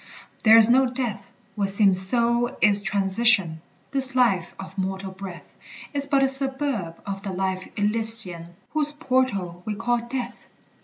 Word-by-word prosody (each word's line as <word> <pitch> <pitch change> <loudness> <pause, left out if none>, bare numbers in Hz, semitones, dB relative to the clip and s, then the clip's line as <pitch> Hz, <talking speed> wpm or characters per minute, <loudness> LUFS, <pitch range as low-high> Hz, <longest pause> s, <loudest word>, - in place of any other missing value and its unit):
There 225 0 +6
is 225 -1 +7
no 260 +2 +3
death! 240 -6 -5 0.3
What 200 -2 -1
seems 195 -2 +3
so 235 +4 -1
is 205 -1 +5
transition: 195 -3 +1 0.3
This 265 -1 +2
life 195 -9 0
of 190 0 -10
mortal 190 0 -5
breath 190 -2 -11 0.4
Is 280 -1 0
but 275 -1 +1
a - - +3
suburb 265 - +1
of 195 -1 -6
the 195 -1 -6
life 185 0 -4
elysian, 205 -5 +1 0.2
Whose 300 -1 0
portal 255 - -2
we 210 +1 -5
call 240 +2 -2
Death. 245 +2 -8
210 Hz, 150 wpm, -22 LUFS, 190-250 Hz, 0.4 s, is